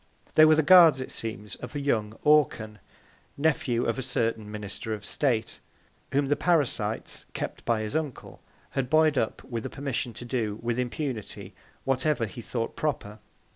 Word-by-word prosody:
They 155 - +8
were 155 0 +6
the 160 - +3
Guards, 170 -4 +8
it 130 - -5
seems, 110 -2 -5
of 125 +3 -9
young 110 -7 -1
Orcan 125 -8 +3 0.6
(Nephew 140 -5 +1
of 115 +3 -1
a - - -1
certain 115 -4 -1
Minister 105 +1 -5
of 100 -1 -10
State) 120 -5 0 0.5
whom 140 +1 +2
the 145 +2 +2
Parasites, 135 -12 0
kept - - -4
by 115 -2 +1
his 110 +4 -4
Uncle, 155 -5 -4 0.3
had 135 -3 -2
buoy'd 155 0 +4
up 115 -4 -1
with 115 -3 -5
a - - -4
Permission 135 -3 -3
to 120 - -8
do, 115 -4 -2
with 120 +1 -1
Impunity, 120 -7 -4 0.3
whatever 135 -1 +1
he 110 +3 -8
thought 115 0 -3
proper. 110 -8 -3
125 Hz, 165 wpm, -27 LUFS, 110-145 Hz, 0.6 s, They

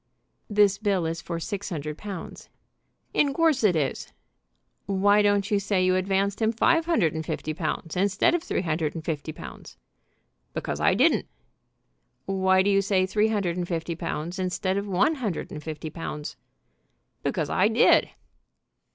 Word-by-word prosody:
"This 205 -1 +3
bill 200 -5 +1
is 165 +1 -3
for 170 -1 -4
six 200 +4 -4
hundred 150 -4 -4
pounds." 195 -1 -8 0.6
"In 280 -2 +2
course 320 -6 +2
it 195 -5 +4
is." 145 -4 -2 0.8
"Why 200 +1 +4
don't 205 0 +2
you 205 - +3
say 195 -2 +1
you 185 0 +3
advanced 195 +2 0
him 220 0 +3
five 330 +8 +2
hundred 190 - +2
and 160 0 -3
fifty 155 0 -4
pounds 160 0 -3
instead 195 - +2
of 345 - +1
three 320 - -2
hundred 160 -2 -1
and 160 -1 -6
fifty 155 -1 -3
pounds?" 155 - -11 0.8
"Because - - -3
I - - +3
didn't." - - +3 1.0
"Why 190 -1 +3
do 200 - +2
you 195 0 +4
say 195 -1 +2
three 210 +3 +2
hundred 200 -6 -1
and 175 -1 -2
fifty 170 -1 -3
pounds 170 +2 -4
instead 185 +1 -1
of 200 +1 -2
one 200 - +2
hundred 205 -8 -3
and 150 -1 -7
fifty 155 0 -6
pounds?" 150 -2 -6 0.9
"Because - - -2
I - - +3
did." - - +4
190 Hz, 165 wpm, -26 LUFS, 165-205 Hz, 1.0 s, it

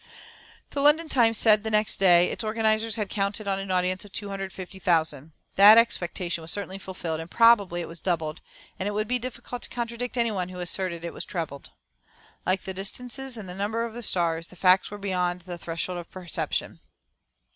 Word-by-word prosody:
The 280 - -2
London 305 +3 +4
Times 230 -5 +3
said 215 -1 +5
next 215 -1 +1
day: 180 -2 +5
"Its - - -4
organisers 220 0 +1
had 210 -3 -2
counted 200 +1 -1
on 195 -1 0
an 195 0 -6
audience 185 0 +1
of 205 - -14
250,000. 185 -6 -2 0.3
That 205 +3 +9
expectation 175 -6 +1
was 160 - -2
certainly 195 -1 -1
fulfilled, 175 -4 -5
and 165 +1 -7
probably 205 -7 +4
it - - -6
was 165 0 -8
doubled, 165 -4 -2 0.4
and 190 - -2
it 205 - -2
would 215 +1 -1
be 250 +1 0
difficult 245 0 -7
to - - -2
contradict 240 +1 -4
any 235 -1 +2
one 185 -3 -2
who 185 - -9
asserted 175 -1 -1
that 170 - -3
it - - -12
was - - -5
trebled. 160 -6 -6 0.8
Like 185 +1 +1
the 190 - -5
distances 245 +6 -2
and 210 -3 -8
the 180 - -6
number 210 +4 -2
of 230 - -7
the 240 - -7
stars, 170 -5 0
the - - -15
facts 185 +1 +4
were 205 - -7
beyond 180 -3 -1
the 175 -1 -8
threshold 170 +2 -4
of 170 - -10
perception." 180 -3 -3
195 Hz, 195 wpm, -26 LUFS, 175-220 Hz, 0.8 s, That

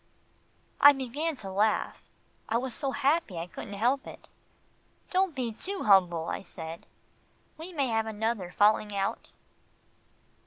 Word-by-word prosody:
I 285 0 +9
began 285 +5 -3
to 195 -7 -8
laugh. 210 +3 0 0.4
I 225 - +2
was 250 0 -3
so 275 +2 -2
happy 275 - 0
I 165 - -3
couldn't 200 +3 -8
help 250 +6 +1
it. - - -11 0.8
"Don't 375 -4 +1
be 250 -3 -2
too 380 - -4
humble," 175 -5 +4
I - - -3
said, 165 -3 -9 0.7
"we 325 +4 -9
may 290 -6 0
have 225 -1 0
another 220 -3 -2
falling 210 +2 +2
out." 195 0 -2
225 Hz, 140 wpm, -29 LUFS, 195-280 Hz, 0.8 s, I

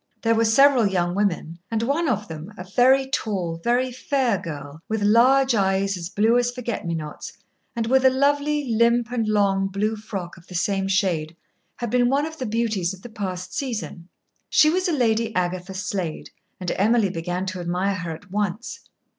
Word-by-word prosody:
There 230 0 +3
were 230 0 +2
several 250 0 +5
young 175 -2 0
women, 175 -4 -1
and 225 0 -1
one 290 +6 +1
of 210 -3 -1
them 160 +4 -8
a 180 - -6
very 255 +8 +4
tall, 180 -10 -2
very 250 +2 +1
fair 255 -4 0
girl, 150 -3 -8
with 220 -1 -1
large 255 +5 +5
eyes 195 -1 +1
as 175 -1 -6
blue 220 +4 +3
as 245 0 +1
forget 245 -6 -4
me 170 - -1
nots, 150 -2 -7 0.4
and 230 -1 -1
with 260 +3 +3
a 260 - +7
lovely, 285 +2 +1
limp, 235 +1 +2
and 230 -3 -1
long 200 -2 +2
blue 205 +3 -1
frock 195 -5 -6
of 170 - -17
the 180 - -9
same 195 +2 0
shade 175 -5 0 0.4
had 240 -3 -4
been 245 -1 +3
one 280 +3 +2
of 315 0 -8
the 255 - -3
beauties 210 -5 -1
of 185 - -20
the 240 - -8
past 185 -4 -5
season. 225 - -4 0.4
She 305 - +5
was 370 +2 0
a - - +1
Lady 230 -5 +1
Agatha 180 +1 -2
Slade, 185 -4 -4 0.3
and 180 -2 -3
Emily 210 0 +3
began 175 +2 -3
to 185 -1 -4
admire 180 +3 -1
her 170 -2 -5
at 165 +4 -9
once. 210 +3 -3
210 Hz, 190 wpm, -23 LUFS, 185-245 Hz, 0.4 s, a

